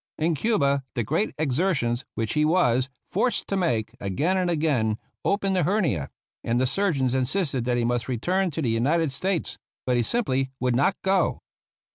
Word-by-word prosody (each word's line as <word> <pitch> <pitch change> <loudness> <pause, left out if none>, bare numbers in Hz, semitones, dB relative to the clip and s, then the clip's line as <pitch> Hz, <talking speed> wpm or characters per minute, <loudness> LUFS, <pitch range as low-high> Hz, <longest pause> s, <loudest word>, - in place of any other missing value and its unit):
In 165 +2 +1
Cuba 140 - +1
the 120 - 0
great 155 - 0
exertions 140 -5 0
which 110 -1 -1
he 150 - +2
was 135 -6 +2 0.2
forced 235 +6 0
to 195 - -1
make, 120 - 0
again 135 - 0
and 185 -2 +1
again 140 -10 +1 0.3
opened 200 -1 +1
the 180 - +2
hernia, 155 - 0 0.3
and 120 +1 +1
the 130 - +2
surgeons 140 -5 +1
insisted 130 -1 0
that 120 -1 +1
he 120 - +1
must 120 0 0
return 180 - 0
to 160 0 -3
the 120 - +1
United 140 +7 +1
States; 185 +5 -2 0.3
but 125 -1 +2
he - - +3
simply 135 - 0
would 125 -1 +1
not 145 +9 +2
go. 190 0 +1
140 Hz, 175 wpm, -25 LUFS, 120-185 Hz, 0.3 s, he